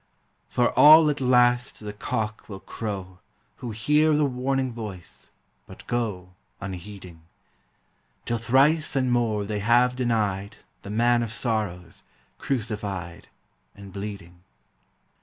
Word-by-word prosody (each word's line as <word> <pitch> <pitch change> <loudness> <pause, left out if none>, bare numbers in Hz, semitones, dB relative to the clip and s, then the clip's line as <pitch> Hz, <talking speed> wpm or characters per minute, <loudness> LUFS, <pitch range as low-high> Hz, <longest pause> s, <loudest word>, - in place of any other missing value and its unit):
For 120 - +1
all 155 +1 +8
at 145 - -5
last 125 -1 +3
the 105 -1 -7
cock 105 +1 -4
will 95 -2 -8
crow 95 -4 -6 0.4
Who 125 - -6
hear 150 +8 +2
the 150 0 +3
warning 130 -1 -1
voice, 105 -6 -8 0.4
but - - -13
go 105 -7 -3 0.3
Unheeding, 95 -2 -9 1.0
Till 120 -1 -1
thrice 140 +7 +3
and 130 -2 +1
more 110 -4 +1
they 105 0 -3
have 120 +4 +3
denied 110 -5 -1 0.3
The - - -10
Man 120 +3 +2
of 115 -2 -3
Sorrows, 105 -8 -3 0.4
crucified 105 -8 -4 0.5
And 100 -2 -12
bleeding. 100 -4 -8
110 Hz, 120 wpm, -25 LUFS, 100-125 Hz, 1.0 s, all